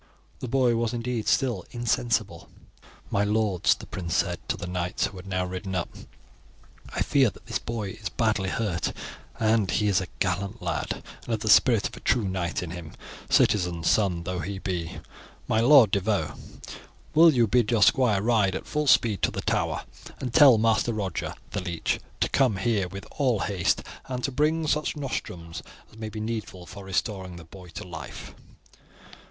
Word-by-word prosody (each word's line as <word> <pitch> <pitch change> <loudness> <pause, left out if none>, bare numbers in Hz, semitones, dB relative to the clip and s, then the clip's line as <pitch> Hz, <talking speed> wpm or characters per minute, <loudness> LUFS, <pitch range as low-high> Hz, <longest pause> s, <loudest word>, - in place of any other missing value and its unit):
The 130 - -5
boy 125 -1 +2
was 115 0 0
indeed 120 -1 -3
still 120 -9 +1
insensible. 115 -6 -1 0.6
"My 100 - +2
lords," 105 -3 +2
the - - -11
prince 85 -3 -4
said - - 0
to - - 0
the - - -6
knights 90 0 -1
who 95 - -6
had 90 +2 -10
now 90 -1 -1
ridden 95 +1 -5
up, 90 - -1 1.0
"I - - -1
fear 135 -4 +3
that - - -17
this - - -2
boy 110 -4 -4
is 100 0 -6
badly 105 -4 0
hurt; 90 -5 -1 0.8
he 105 +3 +1
is 95 -1 +3
a 95 - -5
gallant 100 +4 -1
lad, 85 -4 -2 0.3
and - - -18
has - - +1
the 110 - -1
spirit 115 -1 +5
of - - -11
a - - -10
true 115 -6 +1
knight 90 -2 -2
in 85 - -6
him, 85 -3 -8 0.4
citizen's 90 -5 +3
son 95 -5 +1
though 90 +1 -3
he 95 +5 -4
be. 90 -4 -4 0.5
My 110 - +2
Lord 120 -3 +7
de 100 - +3
Vaux, 90 -8 -1 0.8
will 165 +1 +8
you 120 -5 +3
bid 115 +1 +2
your 115 -4 +4
squire 105 -5 +4
ride 105 -5 +2
at - - -5
full 150 0 -2
speed 115 -6 +4
to - - +3
the - - -4
Tower - - -1 0.4
and 125 -3 -4
tell 140 -6 +8
Master 115 +1 +2
Roger, 100 -3 -3 0.2
the 100 - -2
leech, 85 -2 -2 0.2
to - - +3
come 130 -6 +3
here 100 -2 0
with 100 +2 -8
all 125 -7 +2
haste, 95 -5 0 0.2
and 125 -1 -4
to 135 - 0
bring 155 +4 +1
such 150 0 0
nostrums 90 - -5 0.3
as 110 - -17
may 110 -1 -4
be 110 0 -7
needful 110 -5 -5
for 100 +2 -10
restoring 95 -1 -2
the 85 - -10
boy 90 +3 -13
to 85 - -8
life." 80 -5 -8
105 Hz, 185 wpm, -26 LUFS, 90-120 Hz, 1.0 s, will